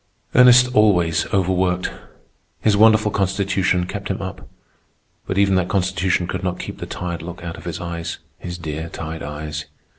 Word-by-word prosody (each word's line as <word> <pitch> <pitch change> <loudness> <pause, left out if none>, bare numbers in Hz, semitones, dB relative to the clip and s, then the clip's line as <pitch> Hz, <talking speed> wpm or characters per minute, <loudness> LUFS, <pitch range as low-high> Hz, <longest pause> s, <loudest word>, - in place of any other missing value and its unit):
Ernest 125 0 +7
always 90 -6 +3
overworked. 90 -1 +1 0.7
His 105 -2 +3
wonderful 110 0 +5
constitution 95 -2 +1
kept 100 +2 -5
him 95 - -2
up; 95 0 -7 0.8
but 95 - -2
even 100 -1 +4
that 90 0 0
constitution 95 -1 +1
could 90 +1 -4
not 90 -1 -1
keep - - -7
the - - -6
tired 85 -2 -4
look 85 +1 -8
out 85 -1 -5
of - - -12
his 85 -1 -4
eyes. 85 -1 -4 0.2
His 90 0 -6
dear, 80 0 -5
tired 80 0 -6
eyes! 75 0 -5
90 Hz, 160 wpm, -21 LUFS, 85-100 Hz, 0.8 s, Ernest